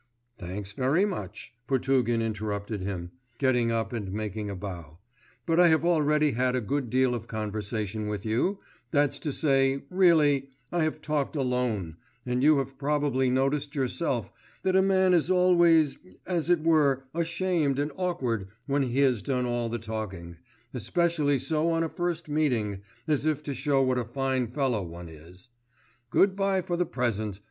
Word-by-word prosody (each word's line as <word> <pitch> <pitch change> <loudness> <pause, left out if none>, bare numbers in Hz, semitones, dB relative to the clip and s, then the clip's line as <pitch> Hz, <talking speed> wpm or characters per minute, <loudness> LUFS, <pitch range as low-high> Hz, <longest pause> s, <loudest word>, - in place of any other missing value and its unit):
'Thanks 95 +3 -6
very 135 - +2
much,' 190 - -6
Potugin 130 -3 +1
interrupted 105 -1 -3
him, 90 -3 -4 0.3
getting 125 -3 +2
up 115 -1 -1
and 105 -5 -4
making 105 0 -4
a 100 - -4
bow; 85 -4 -8 0.5
'but 165 0 +2
I 175 - +7
have 160 0 +3
already 150 -3 +3
had 125 +1 0
a - - +1
good 125 +3 -2
deal 130 0 +2
of 115 -1 -5
conversation 105 -1 -3
with 105 -1 -4
you; 120 - 0 0.3
that's 145 -2 +1
to 150 - -3
say, 135 -2 +2
really, 155 -7 +4 0.2
I 175 -2 +1
have 155 -1 -3
talked 150 0 -1
alone, 125 - -1 0.3
and 125 0 -1
you 150 +1 +5
have 135 0 -3
probably 140 -3 +1
noticed 135 +3 0
yourself 130 -3 -1 0.3
that 190 -1 +1
a 190 - +6
man 190 -1 +3
is 170 -1 +2
always 175 -5 +4 0.3
as 175 -2 -1
it 175 -3 +3
were 145 -5 +3
ashamed 165 -3 0
and 145 +2 -1
awkward 130 - -2 0.2
when 140 0 +1
he 130 +1 0
has 130 -6 +3
done 125 -2 -1
all 120 -1 -1
the 120 - -2
talking, 105 -7 -6 0.4
especially 150 - +1
so 155 +5 0
on 165 0 +1
a 165 - -2
first 175 -1 -3
meeting, 120 -10 0 0.3
as 150 -1 +1
if 150 -1 0
to 145 - -4
show 135 +1 +1
what 130 -1 +1
a - - -1
fine 130 +1 -1
fellow 125 -3 0
one 85 -1 -8
is. 85 +6 -14 0.6
Good 190 +6 +3
bye 195 -1 +1
for 175 - -2
the 175 -1 0
present. 110 -7 -2
135 Hz, 170 wpm, -27 LUFS, 110-155 Hz, 0.6 s, I